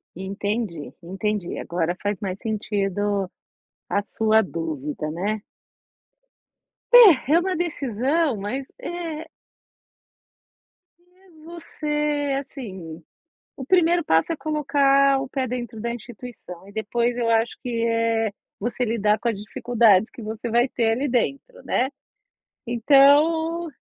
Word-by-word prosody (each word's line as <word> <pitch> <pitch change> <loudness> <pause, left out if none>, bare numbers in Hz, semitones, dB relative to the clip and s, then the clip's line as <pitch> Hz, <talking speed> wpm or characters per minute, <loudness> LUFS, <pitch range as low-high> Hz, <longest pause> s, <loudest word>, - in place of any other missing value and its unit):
Entendi, 195 -2 -4
entendi 195 +1 -3
agora 175 0 -2
faz 205 -1 -1
mais 190 -2 -4
sentido, 205 -2 -1 0.6
a 200 - +1
sua 220 +1 +2
dúvida 155 -4 -4
né. 200 +5 -2 1.5
É, 400 - +8
é 335 - +6
uma 370 +1 -1
decisão, 290 -2 0
mas 250 +7 -4
é 330 -2 -5 1.7
eh, 365 +2 -27 0.2
você, 295 -4 -2
assim, 190 - -9 0.5
o 265 - -6
1º 345 -1 +3
passo, 160 - +2
é - - -3
colocar 275 -2 +2
o 270 - -5
pé 265 -1 -2
dentro 240 -2 -5
da 235 +1 -2
instituição, 230 -6 -10
e - - -13
depois 235 +3 -1
eu 235 -1 0
acho, 225 +1 +1
que 230 -2 -1
é 230 -1 +1 0.3
você 245 +3 -1
lidar 215 -2 +1
com 240 - -2
as 225 - -1
dificuldades, 220 0 +2
que 235 - -10
você 220 +2 -5
vai 240 +3 +3
ter 230 -3 0
ali 270 +5 -1
dentro 275 - -2
né. 260 +3 0 0.8
Então 300 +7 +4
235 Hz, 120 wpm, -23 LUFS, 205-285 Hz, 1.7 s, É